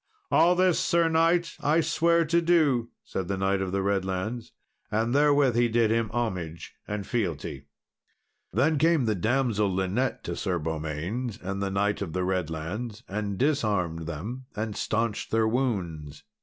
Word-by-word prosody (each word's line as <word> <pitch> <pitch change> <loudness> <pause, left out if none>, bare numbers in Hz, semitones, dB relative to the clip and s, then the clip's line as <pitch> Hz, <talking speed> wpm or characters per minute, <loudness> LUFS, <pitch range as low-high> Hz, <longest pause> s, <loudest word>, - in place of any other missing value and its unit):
"All 175 +2 +5
this, 185 -1 +3
Sir 170 -1 +2
knight, 165 +1 +2
I 150 +3 +3
swear 170 +1 +2
to 170 +2 +2
do," 150 -9 +3
said 95 -2 -4
the 100 0 -2
Knight 95 0 +1
of 95 -1 -2
the 100 0 0
Redlands; 100 +4 -2 0.4
and 115 +2 0
therewith 145 -3 +4
he 120 0 +4
did 115 -1 +2
him 115 -1 +1
homage 90 -9 -3
and 105 -1 -3
fealty. 80 - -3 0.8
Then 140 - +2
came 160 -4 +3
the 110 - +2
damsel 110 0 +1
Linet 95 +8 -1
to - - -4
Sir 95 -3 -1
Beaumains 80 - -3
and 95 +2 -4
the 100 - 0
Knight 100 +2 0
of 85 -6 -4
the 90 - -1
Redlands, 95 +6 -3
and 100 0 -3
disarmed 100 - 0
them, 110 - -6
and 110 0 -3
staunched 110 -1 -1
their 110 0 +2
wounds. 90 - -2
110 Hz, 155 wpm, -27 LUFS, 95-130 Hz, 0.8 s, All